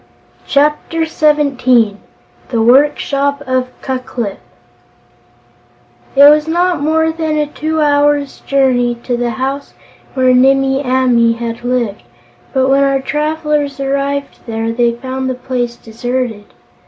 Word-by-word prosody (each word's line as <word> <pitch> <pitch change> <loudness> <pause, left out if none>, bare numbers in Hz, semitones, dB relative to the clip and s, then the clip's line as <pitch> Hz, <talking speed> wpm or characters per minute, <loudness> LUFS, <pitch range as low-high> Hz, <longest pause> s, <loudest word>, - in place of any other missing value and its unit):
Chapter 300 +3 +1
Seventeen 270 -9 +2 0.5
The 235 - -1
Workshop 280 +3 +2
of 255 -1 -1
Ku 260 -1 -2
Klip 235 -5 -5 1.8
It 280 +1 +8
was 300 +1 +5
not 345 -1 +1
more 320 +2 +1
than 320 -1 -2
a 300 - +1
two 310 +2 -3
hours' 290 -1 +1
journey 255 -3 +1
to 245 - -1
the 240 0 -1
house 265 +5 -4 0.4
where 255 -1 +3
Nimmie 270 +1 +3
Amee 250 -3 +2
had 230 0 -6
lived, 245 - -1 0.5
but 260 0 +1
when 275 +1 +3
our 275 -1 +2
travelers 300 0 -2
arrived 280 +1 -2
there 225 0 -2
they 235 0 +1
found 260 +1 -4
the 255 - -2
place 245 -1 -3
deserted. 235 -1 -4
270 Hz, 125 wpm, -14 LUFS, 245-290 Hz, 1.8 s, It